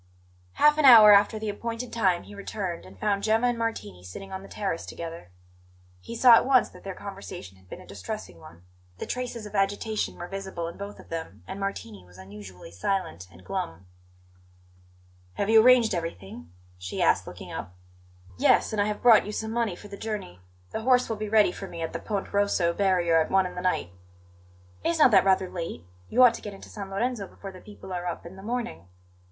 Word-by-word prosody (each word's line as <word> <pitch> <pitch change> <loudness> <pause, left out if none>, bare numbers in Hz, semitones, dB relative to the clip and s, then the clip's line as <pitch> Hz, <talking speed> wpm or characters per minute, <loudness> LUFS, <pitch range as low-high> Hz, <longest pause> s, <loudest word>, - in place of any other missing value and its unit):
Half 300 +1 +4
an 300 - +4
hour 220 -5 +10
after 205 +2 +4
the 215 0 -4
appointed 230 +3 -5
time 185 -6 +1
he - - -13
returned, 195 - -5
and 95 0 -16
found 200 -1 0
Gemma 220 +3 +2
and 245 0 +2
Martini 105 - -4
sitting 190 - -9
on 190 0 -5
the 195 - -13
terrace 195 -5 -3
together. 165 - -8 0.7
He 230 - -8
saw 240 +1 +7
at 230 - +7
once 260 -2 +4
that - - -16
their 195 -1 -6
conversation 195 - -9
had 95 -1 -24
been - - -8
a - - -14
distressing 90 -2 -7
one; 85 +2 -15 0.3
the - - -5
traces 245 -3 -4
of 210 - -10
agitation 205 +2 -1
were 175 - -6
visible 190 -3 -5
in 170 - -7
both 200 +1 -8
of - - -15
them, 165 -1 -6
and 190 +1 -6
Martini 115 - -5
was 90 0 -18
unusually 95 -2 -11
silent 90 - -3
and 90 0 -17
glum. 80 +1 -4 1.5
"Have 200 - -1
you 225 0 +8
arranged 245 -2 +5
everything?" 95 - -6 0.3
she 90 0 -6
asked, - - +2
looking - - -9
up. 90 - -7 0.6
"Yes; - - +3
and 210 - +1
I - - +2
have 210 0 -4
brought 225 -4 +7
you - - -4
some 220 +1 -4
money 230 -5 -1
for 205 - -12
the 200 0 -9
journey. 205 - -6 0.3
The - - -3
horse 250 +1 +3
will 225 - -1
be 215 0 -4
ready 210 -3 +4
for 195 - -8
me 170 -2 -6
at 160 - -4
the - - -3
Ponte 205 -3 -4
Rosso 200 -4 +2
barrier 175 -4 +3
at 155 - -2
one 190 -1 +3
in 180 - -5
the 180 - -5
night." 180 - -1 0.9
"Is 335 - +1
not 300 -5 +6
that 195 -2 +5
rather 190 -1 +3
late? 165 - -6 0.2
You 255 +2 +5
ought 245 -2 +7
to - - -8
get 205 -2 -7
into - - -13
San 200 -2 -7
Lorenzo 205 +1 -2
before 195 - -10
the 185 -1 -13
people 205 -2 -10
are 180 0 -3
up 175 - -5
in 170 +2 -10
the 190 - -11
morning." 215 - -4
195 Hz, 215 wpm, -26 LUFS, 165-220 Hz, 1.5 s, hour